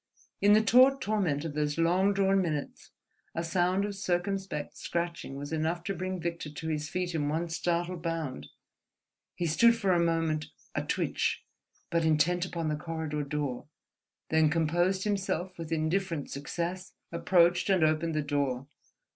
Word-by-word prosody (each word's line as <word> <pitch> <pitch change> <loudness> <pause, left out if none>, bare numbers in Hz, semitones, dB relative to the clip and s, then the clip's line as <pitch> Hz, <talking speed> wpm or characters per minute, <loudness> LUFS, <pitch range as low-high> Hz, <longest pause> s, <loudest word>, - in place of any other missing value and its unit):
In 205 +1 +6
the 215 +1 +5
taut 255 +5 +6
torment 195 - 0
of 160 - -4
those 150 0 -1
long 180 +4 +3
drawn 195 -1 +3
minutes 155 -5 -4 0.5
a 165 - -1
sound 180 +3 +1
of 205 - -3
circumspect 190 -3 -2
scratching 170 -5 -3
was 145 +3 -6
enough 160 +2 -1
to 195 - -2
bring 185 +1 -3
Victor 170 -2 -4
to 150 +2 -7
his 150 0 -2
feet 180 0 -2
in 145 -3 0
one 165 +3 -1
startled 175 +1 -1
bound. 165 -6 -3 0.9
He 175 - -2
stood 230 +9 +5
for 200 -5 +1
a 175 - +3
moment, 165 -2 0 0.3
a - - 0
twitch, - - -1 0.5
but 170 -1 +2
intent 170 +3 +2
upon 170 -3 -3
the 155 - 0
corridor 155 -1 -3
door, 140 -2 -3 0.6
then 160 -1 +4
composed 175 +4 +1
himself 190 -3 -1
with 165 -1 -6
indifferent 165 0 -1
success, 175 +6 -4 0.2
approached 175 +2 +3
and 185 -4 +4
opened 155 +1 +1
the 155 - +1
door. 140 -3 -1
170 Hz, 155 wpm, -29 LUFS, 155-185 Hz, 0.9 s, In